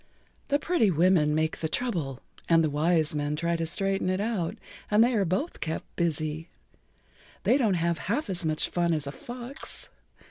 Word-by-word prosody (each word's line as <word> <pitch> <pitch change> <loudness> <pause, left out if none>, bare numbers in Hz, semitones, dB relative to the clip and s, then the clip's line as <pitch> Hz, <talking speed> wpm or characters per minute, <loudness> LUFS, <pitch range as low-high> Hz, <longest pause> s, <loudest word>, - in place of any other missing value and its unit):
"The 285 - +3
pretty 295 - +2
women 165 -3 +3
make 160 0 0
the 160 - -2
trouble 160 - -2 0.3
and 165 -1 +5
the 155 - +1
wise 160 +2 +2
men 150 0 -1
try 170 +2 0
to 165 -1 -1
straighten 195 +2 0
it 185 +1 0
out, 205 -3 -1 0.3
and 210 +2 +6
they 245 +2 +2
are 205 -4 +2
both 190 - -2
kept 160 0 -4
busy. 155 -1 -1 0.9
They - - +4
don't 225 -9 +3
have 170 -2 0
half 280 +7 0
as 185 -2 -3
much 155 -1 0
fun 170 -1 +1
as 150 -2 -3
a 140 - -4
fox." 245 - -8
170 Hz, 180 wpm, -28 LUFS, 155-210 Hz, 0.9 s, and